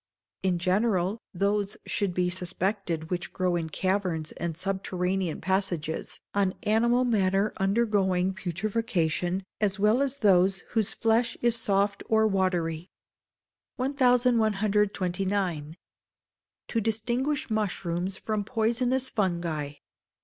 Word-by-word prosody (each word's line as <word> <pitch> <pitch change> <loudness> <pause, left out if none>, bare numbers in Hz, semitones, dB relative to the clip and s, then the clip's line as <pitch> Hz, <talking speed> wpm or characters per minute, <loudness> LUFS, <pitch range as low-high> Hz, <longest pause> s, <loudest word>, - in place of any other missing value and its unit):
In 185 -2 +1
general, 190 +2 +1
those 200 +2 0
should 195 -4 -1
be 180 -1 +1
suspected 180 -2 -2
which 180 -1 -2
grow 180 -1 0
in 165 -2 -2
caverns 180 -3 -1
and 170 -2 -4
subterranean 185 -2 -2
passages, 190 -5 -2
on 200 -1 +1
animal 235 +4 +3
matter 200 -3 +2
undergoing 195 -3 +1
putrefaction, 185 -2 -1 0.2
as 205 -2 +1
well 210 +5 +3
as 280 -1 0
those 190 -4 +4
whose 220 -4 0
flesh 230 +1 +1
is 235 -1 +2
soft 200 -2 +1
or 220 0 +4
watery. 180 -4 0 0.9
1129. 205 - +1 0.9
To 230 - 0
Distinguish 240 +6 -1
Mushrooms 190 -3 -1
from 215 0 -2
Poisonous 245 +4 0
Fungi. 170 -7 -1
195 Hz, 105 wpm, -27 LUFS, 180-220 Hz, 0.9 s, those